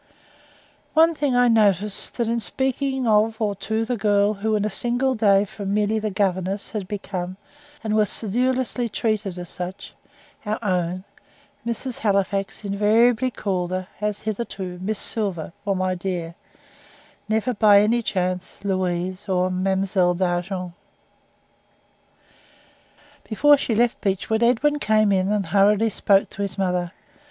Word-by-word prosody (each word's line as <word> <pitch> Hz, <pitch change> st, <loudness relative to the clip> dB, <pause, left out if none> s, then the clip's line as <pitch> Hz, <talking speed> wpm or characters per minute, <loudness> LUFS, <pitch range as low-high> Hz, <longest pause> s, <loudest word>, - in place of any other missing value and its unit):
One 325 Hz, +1 st, +6 dB
thing 290 Hz, -4 st, 0 dB
I 245 Hz, 0 st, +5 dB
noticed, 210 Hz, -3 st, +1 dB
that 235 Hz, -2 st, 0 dB
in 235 Hz, +1 st, 0 dB
speaking 265 Hz, +3 st, -1 dB
of 220 Hz, 0 st, +2 dB
or 210 Hz, -2 st, 0 dB
to 220 Hz, +3 st, -2 dB
the 245 Hz, +1 st, -2 dB
girl 205 Hz, 0 st, +2 dB
who 215 Hz, +2 st, -1 dB
in 210 Hz, 0 st, 0 dB
a -, -, 0 dB
single 245 Hz, +5 st, 0 dB
day 205 Hz, -4 st, +3 dB
from 200 Hz, 0 st, -4 dB
merely 210 Hz, +1 st, +1 dB
the 215 Hz, 0 st, -2 dB
governess 190 Hz, 0 st, -1 dB
had 210 Hz, -4 st, -4 dB
become, 185 Hz, -3 st, -5 dB, 0.5 s
and 215 Hz, -1 st, -1 dB
was 210 Hz, -2 st, +3 dB
sedulously 245 Hz, +2 st, 0 dB
treated 210 Hz, -4 st, -2 dB
as, 175 Hz, 0 st, -9 dB, 0.8 s
our 210 Hz, 0 st, -2 dB
own, 180 Hz, -2 st, -1 dB, 0.6 s
Mrs. 235 Hz, +2 st, -4 dB
Halifax 200 Hz, 0 st, -1 dB
invariably 220 Hz, +5 st, +3 dB
called 185 Hz, -7 st, -2 dB
her, 185 Hz, 0 st, -4 dB
as 210 Hz, -1 st, -2 dB
heretofore, 195 Hz, -4 st, -4 dB
"Miss 210 Hz, +3 st, -2 dB
Silver," 190 Hz, -9 st, -3 dB
or 195 Hz, -, +2 dB
"my 185 Hz, 0 st, 0 dB
dear;" 175 Hz, -2 st, -4 dB, 1.0 s
never 220 Hz, +3 st, +1 dB
by 205 Hz, -2 st, +6 dB
any 230 Hz, +3 st, +2 dB
chance 185 Hz, -2 st, -3 dB
"Louise," 185 Hz, +1 st, -2 dB
or 185 Hz, 0 st, +1 dB
"Mademoiselle 190 Hz, -1 st, +1 dB
D'Argent." 180 Hz, 0 st, -2 dB, 2.6 s
Before 290 Hz, +7 st, +5 dB
she 245 Hz, -5 st, -1 dB
left 240 Hz, +2 st, +1 dB
Beechwood, 205 Hz, +3 st, 0 dB
Edwin 255 Hz, +5 st, +2 dB
came 215 Hz, -4 st, +3 dB
in 190 Hz, 0 st, +1 dB
and 210 Hz, -2 st, 0 dB
hurriedly 205 Hz, +5 st, +3 dB
spoke 195 Hz, -1 st, +3 dB
to 200 Hz, -, -7 dB
his 200 Hz, -1 st, -2 dB
mother. 180 Hz, -2 st, -1 dB
205 Hz, 140 wpm, -23 LUFS, 185-225 Hz, 2.6 s, One